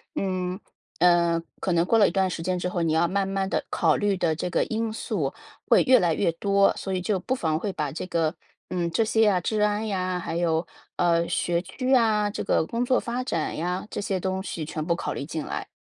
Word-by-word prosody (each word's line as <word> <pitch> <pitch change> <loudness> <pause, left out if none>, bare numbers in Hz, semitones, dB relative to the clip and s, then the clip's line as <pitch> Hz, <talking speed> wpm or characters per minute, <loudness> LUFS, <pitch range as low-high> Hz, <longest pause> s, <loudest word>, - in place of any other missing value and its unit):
嗯， 185 -1 -2 0.4
呃， 170 -1 +4 0.2
可 190 - -1
能 170 0 +3
过 230 - +3
了 205 - +6
一 - - -1
段 190 -1 +1
时 170 - -4
间 185 +1 0
之 180 - -2
后， 180 -1 -2
你 160 -1 +1
要 165 +2 +3
慢 195 +2 0
慢 195 0 -1
地 - - -1
考 160 -3 +2
虑 205 -1 +1
的 165 -3 0
这 180 - -3
个 - - +1
因 225 0 -2
素 - - -2 0.3
会 - - +6
越 260 -1 +6
来 170 -2 +2
越 165 - +1
多， 200 +3 +3
所 190 - -4
以 185 - -1
就 195 +1 0
不 240 +8 -2
妨 160 -9 0
会 200 +2 -3
把 150 -5 -2
这 160 - -5
个， 165 -2 0 0.3
嗯， 175 -2 -1
这 225 - +2
些 225 0 +1
呀， 205 -5 +4
治 215 +4 -1
安 210 +1 +1
呀， 185 -3 -1
还 170 - -4
有， 165 -1 +1 0.3
呃， 170 -1 +2
学 170 0 0
区 255 +9 -2
啊， 215 -4 +3
这 205 - -4
个 - - +2
工 235 +7 -2
作 255 +1 +3
发 245 +2 -3
展 165 -11 -2
呀， 180 +4 -2
这 - - -5
些 195 -2 -1
东 190 +1 -2
西 170 -5 -4
全 155 0 -4
部 170 0 +1
考 - - -4
虑 140 - -5
进 155 0 -4
来， - - -5
185 Hz, 260 characters per minute, -25 LUFS, 170-205 Hz, 0.4 s, 了